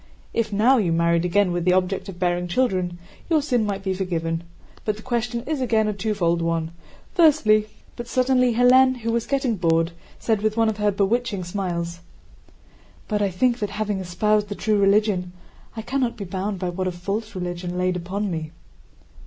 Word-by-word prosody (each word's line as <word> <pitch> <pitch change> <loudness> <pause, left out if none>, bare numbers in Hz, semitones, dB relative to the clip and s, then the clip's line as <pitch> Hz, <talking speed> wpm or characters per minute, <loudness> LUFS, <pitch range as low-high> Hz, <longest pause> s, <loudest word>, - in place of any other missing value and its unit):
If 225 -2 0
now 230 +7 +4
you 190 -7 +1
married 170 +1 +2
again 185 +1 +2
with 175 -1 -1
the 180 +1 +3
object 185 +1 0
of 185 - -8
bearing 175 0 0
children, 185 -5 0 0.3
your 320 -2 +4
sin 245 -7 0
might 195 -1 -3
be 190 -1 0
forgiven. 165 -3 -2 0.4
But 215 -1 -1
the 215 - -12
question 235 -1 -2
is 290 0 -2
again 220 -4 +2
a 210 - 0
twofold 195 -5 0
one: 165 -1 -1 0.4
firstly..." 280 - +4 0.3
But 240 - -7
suddenly 255 -1 +2
Hélène, 255 +2 +5
who 230 +1 -1
was 235 0 -1
getting 270 -5 0
bored, 165 -1 +2 0.3
said 220 -3 0
with 215 +1 0
one 225 -1 +3
of 215 - -3
her 210 0 +2
bewitching 205 +1 0
smiles: 175 -2 -3 1.1
"But 210 -2 -1
I 200 - +2
think 240 +6 +1
that 210 - -2
having 205 -1 -2
espoused 210 +3 0
the 205 - -4
true 215 0 +1
religion 200 -3 +2 0.4
I 220 - -4
cannot 260 -1 -1
be 200 - -5
bound 190 +2 -3
by 180 -1 -2
what 185 +1 -2
a - - 0
false 200 +5 -4
religion 175 0 -4
laid 180 0 +1
upon 190 +3 -3
me." 160 -2 -4
205 Hz, 185 wpm, -23 LUFS, 180-230 Hz, 1.1 s, Hélène